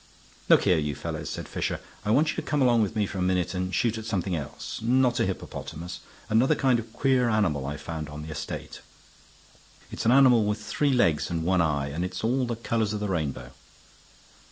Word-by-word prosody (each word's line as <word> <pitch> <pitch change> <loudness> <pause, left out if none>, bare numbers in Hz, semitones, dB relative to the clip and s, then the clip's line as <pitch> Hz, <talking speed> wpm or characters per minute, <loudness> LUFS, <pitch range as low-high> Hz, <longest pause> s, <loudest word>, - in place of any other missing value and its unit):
"Look - - +6
here, 90 -3 +3
you 75 -2 -2
fellows," - - -5
said - - -5
Fisher. - - -2 0.2
"I 105 - -3
want 145 +8 +4
you - - -7
to - - 0
come 150 - -1
along 120 -3 +4
with 110 +1 -1
me 105 -1 +1
for 95 - -5
a - - -1
minute 90 0 +1
and 90 0 -2
shoot 110 +4 0
at 110 - -8
something 95 -4 -1
else. 75 -4 -6
Not 125 +2 +2
a - - +2
hippopotamus. 85 +3 -6 0.3
Another 115 +4 +3
kind 130 -3 +2
of 115 0 -8
queer 130 -1 +2
animal 85 -11 +1
I've 75 +1 -5
found 80 -1 -5
on 75 +1 -7
the 80 - -7
estate. 75 -1 -6 1.1
It's - - -4
an - - +6
animal 125 -4 +6
with 105 +1 -1
three 140 +7 0
legs 85 - +2
and 85 -1 -2
one 90 +1 +2
eye, 70 -3 0
and 80 +5 -3
it's 90 - -4
all 125 +2 +1
the 120 - -2
colors 110 -2 -1
of 105 - -2
the 105 -1 -2
rainbow." 70 -8 -3
105 Hz, 215 wpm, -27 LUFS, 80-120 Hz, 1.1 s, Look